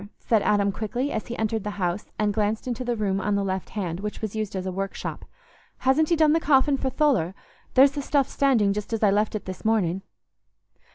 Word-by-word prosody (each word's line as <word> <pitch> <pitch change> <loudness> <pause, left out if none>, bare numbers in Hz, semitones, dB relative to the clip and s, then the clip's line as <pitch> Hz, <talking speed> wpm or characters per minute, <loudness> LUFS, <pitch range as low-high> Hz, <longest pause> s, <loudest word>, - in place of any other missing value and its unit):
said 225 -3 +1
Adam 200 -1 +2
quickly, 240 +7 -3
as 220 - -3
he 240 - -5
entered 220 -1 -1
the 210 - -3
house 180 +1 -2
and 210 -1 +1
glanced 215 +3 -1
into 250 0 -2
the 240 -1 -1
room 195 -3 -1
on 205 +1 0
the 200 - 0
left 190 -1 -3
hand, 180 -5 -3
which 210 +1 -5
was 220 -1 -4
used 215 -2 -3
as 185 -1 -3
a 185 - -2
workshop. 195 +1 -5 0.5
"Hasn't 285 +4 +2
he 340 - +4
done 310 -1 +4
the 325 - +3
coffin 280 -2 +3
for 265 0 -1
Tholer? 245 - +1 0.4
There's 270 +1 +7
the 285 0 -4
stuff 275 -1 +1
standing 235 -8 +2
just 210 +2 -5
as 225 - -1
I 205 - +5
left 210 +2 +1
it 210 - -4
this 185 -1 -7
morning." 195 -5 +1
215 Hz, 225 wpm, -25 LUFS, 195-260 Hz, 0.5 s, There's